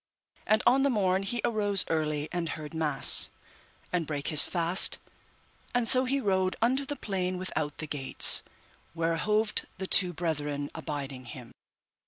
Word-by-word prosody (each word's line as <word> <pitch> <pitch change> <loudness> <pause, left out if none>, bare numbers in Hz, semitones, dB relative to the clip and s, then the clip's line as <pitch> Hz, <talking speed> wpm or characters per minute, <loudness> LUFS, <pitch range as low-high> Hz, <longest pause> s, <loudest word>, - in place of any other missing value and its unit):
And 215 0 +2
on 255 +3 +4
the 280 - +2
morn 190 -5 0
he 235 +5 -3
arose 205 -3 0
early 155 -2 -2
and 175 -2 -3
heard 155 -1 -7
mass, 155 -4 +6 0.6
and 170 -4 -1
brake 145 -2 -4
his 155 -2 +7
fast, 175 +1 +1 0.8
and 245 -2 +1
so 255 +2 +7
he 275 +2 -1
rode 190 -5 -1
unto 260 +4 0
the 290 - -4
plain 185 -7 -4
without 155 -5 -4
the 155 - -6
gates, 140 -3 +1 0.5
where 165 0 -1
hoved 215 +4 0
the 190 - -5
two 185 -1 +2
brethren 150 -4 -4
abiding 140 -5 -7
him. 125 -2 -11
175 Hz, 155 wpm, -27 LUFS, 150-210 Hz, 0.8 s, his